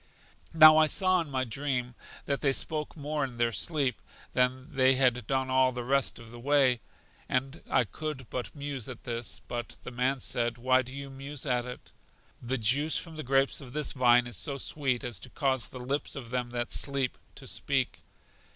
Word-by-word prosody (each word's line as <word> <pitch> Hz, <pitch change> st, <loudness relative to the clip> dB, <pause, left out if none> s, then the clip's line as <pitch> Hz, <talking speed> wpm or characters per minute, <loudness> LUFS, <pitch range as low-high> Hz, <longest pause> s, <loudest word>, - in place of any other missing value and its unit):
Now 155 Hz, -1 st, +10 dB
I 155 Hz, 0 st, +6 dB
saw 185 Hz, +2 st, +3 dB
in 160 Hz, -, -6 dB
my 130 Hz, -1 st, 0 dB
dream 125 Hz, 0 st, -2 dB, 0.3 s
that 140 Hz, -1 st, -1 dB
they 135 Hz, -2 st, +3 dB
spoke 155 Hz, +2 st, -3 dB
more 150 Hz, 0 st, -2 dB
in 125 Hz, -3 st, -5 dB
their 120 Hz, 0 st, +2 dB
sleep 140 Hz, -, -1 dB, 0.3 s
than 130 Hz, +4 st, 0 dB
they 130 Hz, -1 st, +5 dB
had 125 Hz, -4 st, +2 dB
done 130 Hz, -1 st, 0 dB
all 130 Hz, 0 st, +4 dB
the 125 Hz, -1 st, -5 dB
rest 135 Hz, +2 st, +1 dB
of 115 Hz, -1 st, -12 dB
the 120 Hz, -, -10 dB
way, 135 Hz, -2 st, +3 dB, 0.5 s
and 135 Hz, +4 st, -1 dB
I -, -, +4 dB
could 150 Hz, -6 st, -6 dB
but 125 Hz, +3 st, -4 dB
muse 140 Hz, -4 st, -4 dB
at 125 Hz, -, -9 dB
this, 120 Hz, 0 st, -3 dB
but 120 Hz, -1 st, -5 dB
the -, -, -7 dB
man 130 Hz, +2 st, 0 dB
said: 120 Hz, -1 st, 0 dB
Why 130 Hz, +2 st, +3 dB
do 130 Hz, 0 st, -9 dB
you 140 Hz, 0 st, -7 dB
muse 135 Hz, +1 st, -6 dB
at 125 Hz, -2 st, 0 dB
it? 125 Hz, -, -9 dB, 0.5 s
The 130 Hz, +2 st, -2 dB
juice 135 Hz, +8 st, +3 dB
from 165 Hz, -2 st, -4 dB
the 155 Hz, -, -5 dB
grapes 135 Hz, +2 st, +2 dB
of 125 Hz, -2 st, -11 dB
this 150 Hz, -1 st, -1 dB
vine 125 Hz, -2 st, +4 dB
is 120 Hz, -, -2 dB
so 140 Hz, -1 st, 0 dB
sweet 135 Hz, -3 st, -1 dB
as 120 Hz, -7 st, -4 dB
to -, -, -10 dB
cause 135 Hz, -4 st, 0 dB
the 130 Hz, -, -9 dB
lips 135 Hz, +4 st, -3 dB
of 120 Hz, -4 st, -7 dB
them 125 Hz, -1 st, -1 dB
that 120 Hz, 0 st, -3 dB
sleep 140 Hz, -3 st, 0 dB, 0.2 s
to -, -, -11 dB
speak. -, -, -1 dB
130 Hz, 200 wpm, -29 LUFS, 125-140 Hz, 0.5 s, Now